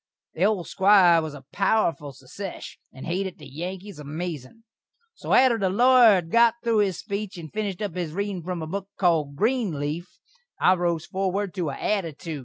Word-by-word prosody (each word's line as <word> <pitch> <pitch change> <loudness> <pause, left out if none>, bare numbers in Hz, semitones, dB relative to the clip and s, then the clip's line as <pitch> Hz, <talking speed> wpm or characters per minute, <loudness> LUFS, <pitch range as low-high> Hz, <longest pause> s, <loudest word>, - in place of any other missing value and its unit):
The 175 - +1
old 200 -5 0
Squire 190 -4 +5
was 155 -2 -6
a 135 -2 -13
powerful 185 -8 +1
sesesh, 140 +9 -9
and 130 - -10
hated 185 +2 -3
the - - -13
Yankees 180 +5 -7
amazin'. 155 - -6 0.5
So - - -7
atter 250 -3 +5
the 190 -2 +1
lawyer 240 +1 +6
had 170 -3 -3
got 235 0 +5
thru 230 -2 +2
his 195 -4 +1
speech 200 -1 -5
and 160 -3 -9
finished 210 -2 -3
up 200 -5 -3
his 175 -4 -3
readin' 200 +1 -3
from 175 -1 -4
a - - -5
book 195 +3 -5
called 160 -6 +1
"Greenleaf," 175 - -1 0.5
I 185 - +5
rose 175 -2 -1
forward 195 0 -2
to 175 -6 -2
a 140 - -5
attitood. 165 -6 -3
185 Hz, 180 wpm, -25 LUFS, 160-205 Hz, 0.5 s, lawyer